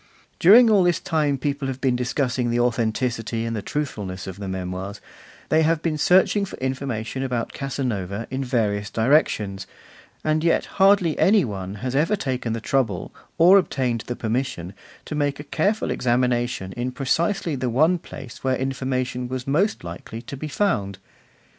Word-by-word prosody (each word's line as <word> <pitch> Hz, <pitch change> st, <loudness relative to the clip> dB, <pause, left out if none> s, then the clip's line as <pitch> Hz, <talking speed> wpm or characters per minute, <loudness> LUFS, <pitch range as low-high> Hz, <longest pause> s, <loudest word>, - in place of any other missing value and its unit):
During 225 Hz, +8 st, +8 dB
all 210 Hz, -3 st, +5 dB
this 175 Hz, -2 st, +2 dB
time 155 Hz, -6 st, 0 dB
people 140 Hz, 0 st, -2 dB
have 130 Hz, -1 st, -4 dB
been 130 Hz, -2 st, +1 dB
discussing 125 Hz, 0 st, -1 dB
the 120 Hz, +1 st, +1 dB
authenticity 115 Hz, -1 st, 0 dB
and 115 Hz, 0 st, -2 dB
the 105 Hz, -, -3 dB
truthfulness 100 Hz, -10 st, -4 dB
of 95 Hz, 0 st, -8 dB
the 100 Hz, -, -5 dB
Memoirs, 95 Hz, +2 st, -5 dB, 0.5 s
they 155 Hz, -, +4 dB
have 160 Hz, 0 st, +1 dB
been 165 Hz, -2 st, 0 dB
searching 190 Hz, +4 st, +4 dB
for 195 Hz, -, -6 dB
information 130 Hz, -2 st, -3 dB
about 125 Hz, -3 st, -2 dB
Casanova 115 Hz, -7 st, -3 dB
in 135 Hz, +1 st, -2 dB
various 105 Hz, -5 st, 0 dB
directions, 110 Hz, -6 st, +1 dB, 0.6 s
and 155 Hz, 0 st, +1 dB
yet 170 Hz, -, +2 dB, 0.2 s
hardly 195 Hz, -5 st, +4 dB
any 200 Hz, -3 st, +5 dB
one 95 Hz, -3 st, -5 dB
has 130 Hz, +1 st, -2 dB
ever 165 Hz, +9 st, +2 dB
taken 125 Hz, -, -2 dB
the 115 Hz, -, -2 dB
trouble, 115 Hz, -, -1 dB, 0.2 s
or 180 Hz, +4 st, +7 dB
obtained 125 Hz, -, -1 dB
the 120 Hz, -, -3 dB
permission, 110 Hz, -7 st, -3 dB, 0.3 s
to -, -, -6 dB
make 145 Hz, -1 st, -1 dB
a -, -, -5 dB
careful 195 Hz, +9 st, 0 dB
examination 120 Hz, -5 st, 0 dB
in 125 Hz, +4 st, -3 dB
precisely 165 Hz, +6 st, 0 dB
the 130 Hz, -1 st, -2 dB
one 155 Hz, +9 st, +3 dB
place 130 Hz, -6 st, -10 dB
where 130 Hz, -1 st, +2 dB
information 130 Hz, -1 st, -2 dB
was 130 Hz, 0 st, -4 dB
most 170 Hz, -, +1 dB
likely 85 Hz, +6 st, -7 dB
to 140 Hz, -, -7 dB
be 150 Hz, +3 st, -5 dB
found. 105 Hz, -, 0 dB
130 Hz, 165 wpm, -23 LUFS, 115-150 Hz, 0.6 s, During